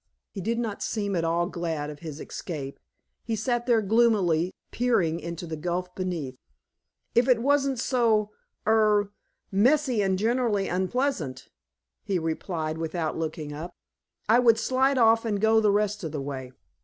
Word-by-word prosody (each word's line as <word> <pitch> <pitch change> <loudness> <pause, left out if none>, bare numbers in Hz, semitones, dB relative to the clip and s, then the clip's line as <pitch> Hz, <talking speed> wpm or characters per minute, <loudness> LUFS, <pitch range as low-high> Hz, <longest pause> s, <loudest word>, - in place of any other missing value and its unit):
He 195 - -6
did 230 +5 -1
not 225 -4 -3
seem 205 -3 -2
at 170 - 0
all 170 +1 +1
glad 165 -5 -3
of 150 - -11
his 155 -2 -7
escape. 145 -6 -6 0.4
He 225 - -2
sat 240 +2 -1
there 230 -3 +3
gloomily, 195 -6 +3 0.2
peering 190 -10 +1
into 170 +1 -6
the 160 -1 -5
gulf 180 +3 -3
beneath. 170 -9 -4 0.8
"If 240 +2 +3
it 250 -3 +4
wasn't 275 -1 +2
so 225 -4 +2 0.3
er 210 -2 +3 0.4
messy 250 +3 +3
and 190 -1 +1
generally 225 -2 +1
unpleasant," 185 - -2 0.5
he 195 - 0
replied 160 -1 -3
without 165 -1 -2
looking 155 -2 -4
up, 165 +4 -7 0.5
"I 230 +3 +5
would 230 -2 +5
slide 260 +3 +2
off 225 -1 +5
and 210 -3 -1
go 220 +1 +4
the 215 -1 +3
rest 210 0 0
of 160 - -3
the 145 - -3
way." 135 -2 -6
200 Hz, 155 wpm, -26 LUFS, 165-230 Hz, 0.8 s, I